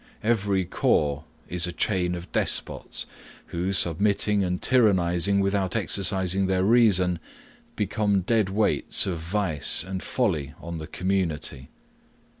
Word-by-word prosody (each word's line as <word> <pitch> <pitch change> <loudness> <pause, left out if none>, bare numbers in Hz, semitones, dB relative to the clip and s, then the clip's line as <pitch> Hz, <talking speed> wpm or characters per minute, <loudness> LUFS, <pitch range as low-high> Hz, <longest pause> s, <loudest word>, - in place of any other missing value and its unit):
Every 100 -4 +1
corps 75 -3 0 0.2
is 90 +1 +1
a - - -4
chain 90 -1 -1
of 85 +1 -9
despots, - - -2 0.5
who, 90 +3 -1
submitting 100 +3 +2
and 90 -1 -2
tyrannizing 100 -5 +2
without 100 -1 -1
exercising 95 -1 +1
their 95 -1 +1
reason, 95 -6 +3 0.6
become 105 -1 0
dead 110 +1 +1
weights 105 +2 +1
of 90 -4 -3
vice 85 -3 +1
and 95 0 -5
folly 80 - -2
on 85 0 -7
the 80 - -7
community. 85 -8 -2
95 Hz, 120 wpm, -25 LUFS, 85-100 Hz, 0.6 s, reason